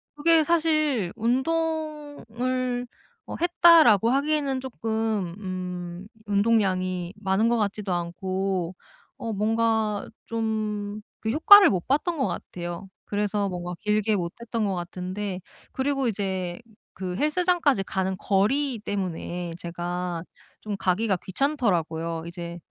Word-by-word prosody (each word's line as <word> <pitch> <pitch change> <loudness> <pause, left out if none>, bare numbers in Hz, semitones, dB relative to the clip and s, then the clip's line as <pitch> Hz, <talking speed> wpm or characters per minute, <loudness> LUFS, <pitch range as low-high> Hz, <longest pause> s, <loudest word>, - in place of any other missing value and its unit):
그게 320 +1 +4
사실 310 - +1
'운동을 255 -3 -1 0.4
어 - - -5
했다.'라고 330 - +6
하기에는 280 -1 +1
쪼끔 220 -7 -2
음 180 -1 -5 0.2
운동량이 190 -4 +1
많은 195 +4 +2
것 240 - +2
같지도 205 -3 -1
않고 185 +1 -2 0.4
어 225 -1 -4
뭔가 220 0 +1 0.2
좀 215 -2 -2 0.2
그 220 - -1
효과를 390 - +8
못 180 -4 -2
봤던 305 +5 +1
것 265 - +1
같아요. 175 +2 -6 0.2
그래서 205 0 0
뭔가 180 -1 -4
길게 210 +1 +1
못 170 -2 -2
했던 230 -2 -2
것 195 - 0
같은데 185 +2 -4 0.3
그리고 270 -1 0
이제 190 -4 -2 0.4
그 185 -1 -4
헬스장까지 305 - +2
가는 190 -1 -1
거리 235 +8 +1
때문에 180 -4 -4
제가 175 0 -4 0.4
좀 210 -1 -4
가기가 195 +2 +1
귀찮더라고요. 170 - -1
이제 170 0 -7
210 Hz, 245 characters per minute, -26 LUFS, 185-260 Hz, 0.4 s, 효과를